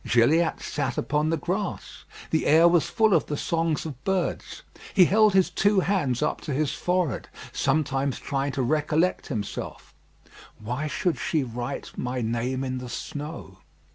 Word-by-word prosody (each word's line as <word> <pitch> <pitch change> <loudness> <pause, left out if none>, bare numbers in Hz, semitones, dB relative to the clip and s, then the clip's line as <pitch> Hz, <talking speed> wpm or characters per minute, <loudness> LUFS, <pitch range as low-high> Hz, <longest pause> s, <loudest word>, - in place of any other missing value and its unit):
Gilliatt 155 +8 +3
sat 145 - -2
upon 150 +1 0
the 165 - +1
grass. 185 +5 -4 0.3
The 160 - +1
air 160 +3 +7
was 170 -2 +3
full 220 -3 +3
of - - +2
the 145 - -2
songs 165 -1 -1
of 140 -4 -7
birds. 190 -2 -2 0.3
He 185 -3 +8
held 210 +2 +4
his 190 -1 +4
two 205 -1 +3
hands 160 -11 0
up - - -1
to 145 - -4
his 150 0 0
forehead, 180 - -1 0.2
sometimes 140 -3 0
trying 140 -1 -2
to 135 -2 -1
recollect 155 +6 +1
himself: 110 -8 -5 0.7
"Why 125 +8 -3
should 170 +3 -1
she 155 -4 0
write 120 0 -5
my 125 +1 -2
name 120 +3 -1
in 130 -1 -3
the 125 -1 -7
snow?" 150 +6 -7
150 Hz, 160 wpm, -26 LUFS, 130-175 Hz, 0.7 s, He